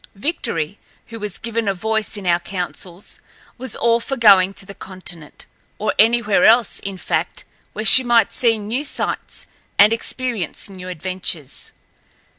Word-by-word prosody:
Victory, 200 - -2 0.3
who 230 -1 -8
was 210 -3 -4
given 230 -2 -3
a 195 - +1
voice 220 +2 -1
in 200 - -7
our 175 -1 +3
councils, 180 0 -6 0.4
was 255 -2 -4
all 235 0 +2
for 270 +3 -4
going 195 -5 +6
to - - -6
the 200 - -10
continent, 180 -5 -8 0.3
or 215 - -1
anywhere 220 -4 +4
else, 230 0 +5
in 195 -1 -6
fact, - - -2 0.3
where 215 - -4
she 260 - +7
might 240 -2 +3
see 230 -3 +2
new 220 +7 -3
sights 295 - -4 0.3
and 210 +2 +7
experience 230 - -2
new 185 -2 -9
adventures. 180 -5 -3
210 Hz, 150 wpm, -20 LUFS, 185-230 Hz, 0.4 s, she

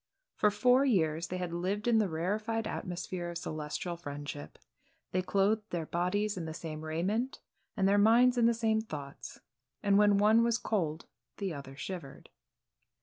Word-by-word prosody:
For 210 - +3
four 250 +6 +4
years 170 - +1
they 185 - -4
had 180 -2 -4
lived 195 +6 -2
in 230 -2 +5
the 210 -3 +1
rarified 215 +7 -1
atmosphere 175 -1 -4
of 170 - -4
celestial 155 +2 -4
friendship. 145 - -7 0.5
They 185 - +1
clothed 205 +3 +1
their 170 -2 -3
bodies 190 +5 -1
in 170 - -4
the 160 0 -6
same 155 -2 -6
raiment, 190 +11 -1 0.4
and 195 -2 +3
their 200 +1 +4
minds 240 +4 +6
in 235 -1 +4
the 235 - +3
same 220 -1 +1
thoughts, 145 -9 -8 0.4
and 200 0 +4
when 205 -1 +5
one 215 +3 +5
was 235 -1 +2
cold 170 -9 -2 0.3
the 195 -4 -2
other 140 -2 -8
shivered. 165 -2 -7
190 Hz, 165 wpm, -31 LUFS, 165-220 Hz, 0.5 s, minds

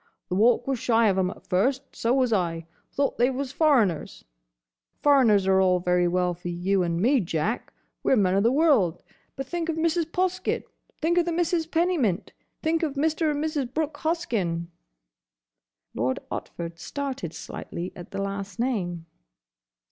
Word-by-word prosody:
"The 180 - -1
Walk 235 +4 +4
was 270 -3 -1
shy 230 -2 +3
of 190 - +1
'em 185 -1 +1
at 195 - -11
first. 260 +9 0
So 230 - 0
was 255 -3 +2
I. 170 -4 -1 0.3
Thought 280 -3 -1
they 245 +2 +4
was 265 0 -3
foreigners. 260 - +1 0.8
Foreigners 245 -9 +5
are 190 0 +4
all 185 -1 +3
very 180 0 +2
well 180 0 +1
for 175 +1 -9
you 185 +3 0
and 170 -1 0
me, 255 +8 +4
Jack. 180 +4 -2 0.3
We - - +1
're - - +6
men 190 -5 +3
o' 195 - +3
the 230 +3 +3
world. 265 - +3 0.3
But 270 - -4
think 335 +3 -3
of 325 - 0
Mrs. 330 0 0
Poskett! 370 0 0 0.4
Think 340 +3 +2
of 345 - +2
the 345 - -1
Misses 335 -1 0
Pennymint! 325 - 0 0.3
Think 325 0 +1
of 300 -4 -1
Mr. 315 +2 +1
and 295 0 -1
Mrs. 295 -6 -2
Brooke 310 0 -2
Hoskyn!" 215 - -1 1.2
Lord 125 +3 0
Otford 170 -1 -6
started 265 - -4
slightly 175 +2 -6
at 175 - -10
the 195 0 -3
last 200 -1 -5
name. 185 -9 -2
235 Hz, 170 wpm, -26 LUFS, 180-305 Hz, 1.2 s, re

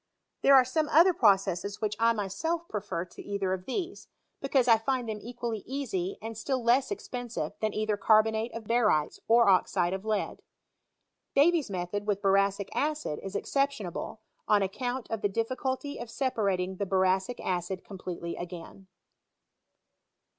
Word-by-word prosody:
There 275 - +7
are 260 -1 +7
some 300 +4 0
other 340 +5 +6
processes 200 - +2
which 210 -1 -1
I 230 0 +5
mpelf 315 - -2
prefer 195 -5 -3
to - - -12
either 200 -2 -2
of 185 -1 -5
these, 360 +7 -4 0.3
because 270 -2 +2
I 225 -2 +6
find 250 +1 -1
them 215 -1 -4
equally 235 -1 -4
easy, 220 -9 -3
and 225 0 -5
still 255 +3 -2
less 245 +3 +3
expensive 245 - -4
than 215 -1 0
either 215 -1 0
carbonate 220 +2 +3
of 230 - -5
ba 230 +3 +1
rytes 155 -9 +1
or 235 0 +5
oxide 185 -1 +3
of 190 0 -4
lead. 215 -2 -2 0.9
Davy's 310 -1 +4
method 195 +2 -3
with 205 -1 0
boracic 195 0 +2
acid 300 - -1
is 195 +1 -7
exceptionable, 220 -8 -2 0.3
on 205 -2 +4
account 245 +5 -3
of 225 -2 -2
the 205 - +1
difficulty 260 +6 -2
of 240 - -6
sepai 230 -6 0
ating 185 +1 -4
the 200 - -2
boracic 190 +4 +1
acid 180 0 -3
completely 180 -3 -6
t^in. 180 +2 -8
215 Hz, 155 wpm, -29 LUFS, 195-250 Hz, 0.9 s, There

